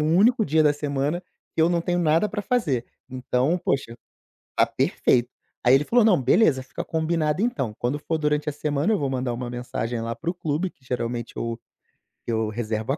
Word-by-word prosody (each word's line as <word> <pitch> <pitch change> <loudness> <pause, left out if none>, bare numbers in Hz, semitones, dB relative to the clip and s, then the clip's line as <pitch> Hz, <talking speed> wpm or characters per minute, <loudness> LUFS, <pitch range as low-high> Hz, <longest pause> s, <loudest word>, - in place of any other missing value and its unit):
único 195 +10 +4
dia 155 +2 +3
da 150 -1 +4
semana 145 +4 -2 0.3
que 160 - +3
eu 165 - +5
não 170 -1 +2
tenho 175 0 0
nada 165 +5 +3
pra 205 -1 -4
fazer. 155 - 0 0.3
Então 130 +5 0
poxa, 120 -4 -1 0.6
tá - - +5
perfeito" 120 0 +1 0.4
Aí 125 - +7
ele 135 - +3
falou: 240 -1 +4
"Não 190 -8 +5
beleza, 130 - +3
fica - - -6
combinado 160 0 0
então, 135 - -1
quando 130 +5 -1
for 160 +2 -2
durante 150 0 0
a - - -2
semana 150 +7 0
eu - - +2
vou 140 -2 -1
mandar 125 -1 -1
uma 120 +1 -4
mensagem 120 -1 -3
lá 115 +1 -3
para 165 - -4
o - - -10
clube 165 +2 -1
que 130 - -34
geralmente 120 -1 -3
eu 115 0 -3 0.7
que 120 - -2
eu 110 -1 0
reservo 110 +1 -2
a - - -3
145 Hz, 205 wpm, -24 LUFS, 125-165 Hz, 0.7 s, Aí